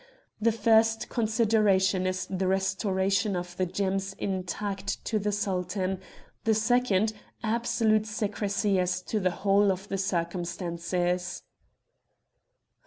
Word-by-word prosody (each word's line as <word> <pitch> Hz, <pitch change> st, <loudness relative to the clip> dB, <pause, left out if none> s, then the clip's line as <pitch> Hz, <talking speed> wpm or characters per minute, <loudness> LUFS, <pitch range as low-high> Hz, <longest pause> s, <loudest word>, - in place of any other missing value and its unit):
The 230 Hz, +1 st, +4 dB
first 225 Hz, 0 st, +3 dB
consideration 215 Hz, -5 st, +2 dB
is 185 Hz, 0 st, -2 dB
the 190 Hz, 0 st, -1 dB
restoration 195 Hz, +1 st, +1 dB
of 175 Hz, 0 st, -5 dB
the 185 Hz, -, +1 dB
gems 195 Hz, +1 st, -1 dB
intact 195 Hz, +2 st, -3 dB
to 220 Hz, -, 0 dB
the 210 Hz, +1 st, -1 dB
Sultan; 190 Hz, -2 st, -1 dB, 0.4 s
the 220 Hz, -1 st, +3 dB
second, 220 Hz, -2 st, +2 dB, 0.3 s
absolute 225 Hz, -1 st, +1 dB
secrecy 205 Hz, -1 st, 0 dB
as 180 Hz, 0 st, 0 dB
to 215 Hz, -, -1 dB
the 185 Hz, -2 st, +2 dB
whole 200 Hz, +2 st, +3 dB
of 190 Hz, +2 st, -5 dB
the 195 Hz, -, -2 dB
circumstances." 175 Hz, 0 st, -2 dB
195 Hz, 110 wpm, -28 LUFS, 185-215 Hz, 0.4 s, The